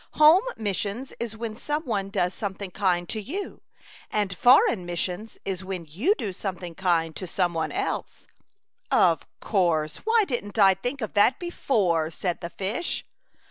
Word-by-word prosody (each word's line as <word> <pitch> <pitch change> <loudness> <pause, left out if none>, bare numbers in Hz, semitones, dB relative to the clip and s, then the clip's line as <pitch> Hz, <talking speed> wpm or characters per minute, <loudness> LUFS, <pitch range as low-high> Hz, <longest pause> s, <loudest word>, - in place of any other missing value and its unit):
" - - -37
Home 320 +5 +9 0.2
missions 210 +4 -3
is 230 -2 -4
when 225 -1 -4
some 295 +6 -2
one 200 -5 -1
does 180 -2 0
something 200 -2 -5
kind 180 -3 +1
to 220 - -3
you, 355 - -6 0.5
and 205 -3 -1
foreign 235 -3 +5
missions 180 +5 -4
is 190 -1 -3
when 185 -3 -5
you 230 - +1
do 205 - -4
something 180 -3 -5
kind 165 -3 +1
to 185 - -5
some 175 0 0
one 160 -1 -1
else." 395 +2 -3 0.6
"Of - - +3
course; 165 -6 +1
why 450 0 +3
didn't 230 - -4
I 195 -2 +7
think 245 +9 -4
of 220 - -4
that 220 +5 +4
before?" 200 - 0
said 175 +1 -3
the 170 - -4
fish. 200 - -3
200 Hz, 165 wpm, -26 LUFS, 180-235 Hz, 0.6 s, Home